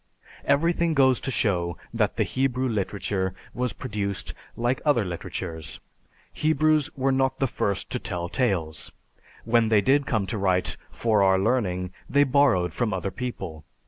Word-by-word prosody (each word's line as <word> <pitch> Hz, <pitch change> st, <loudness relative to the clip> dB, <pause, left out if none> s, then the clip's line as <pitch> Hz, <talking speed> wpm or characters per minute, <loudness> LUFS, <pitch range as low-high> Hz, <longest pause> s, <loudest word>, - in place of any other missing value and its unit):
"Everything 165 Hz, +2 st, +2 dB
goes 130 Hz, -3 st, +4 dB
to -, -, -4 dB
show 90 Hz, -9 st, 0 dB, 0.2 s
that -, -, +1 dB
the -, -, +2 dB
Hebrew 130 Hz, 0 st, 0 dB
literature 100 Hz, -3 st, -2 dB, 0.2 s
was 125 Hz, -1 st, -1 dB
produced 100 Hz, -6 st, -4 dB, 0.2 s
like 120 Hz, +2 st, 0 dB
other 140 Hz, -8 st, +3 dB
literatures. 80 Hz, -2 st, -5 dB, 0.5 s
Hebrews 155 Hz, -1 st, +2 dB
were 135 Hz, 0 st, +2 dB
not 130 Hz, 0 st, +1 dB
the 135 Hz, -, +1 dB
first 100 Hz, -5 st, -2 dB
to -, -, -1 dB
tell 85 Hz, 0 st, -4 dB
tales. 85 Hz, -9 st, -1 dB, 0.5 s
When 115 Hz, -1 st, +3 dB
they 110 Hz, -2 st, +5 dB
did 140 Hz, +4 st, +3 dB
come 110 Hz, -4 st, +1 dB
to 105 Hz, +2 st, -3 dB
write 95 Hz, -2 st, +1 dB
'for 110 Hz, -3 st, +1 dB
our 95 Hz, -1 st, +5 dB
learning' 95 Hz, -4 st, 0 dB, 0.2 s
they 145 Hz, 0 st, +5 dB
borrowed 130 Hz, -10 st, +3 dB
from 115 Hz, -4 st, -1 dB
other 95 Hz, +1 st, -3 dB
people. 95 Hz, -11 st, -5 dB
115 Hz, 150 wpm, -25 LUFS, 95-130 Hz, 0.5 s, they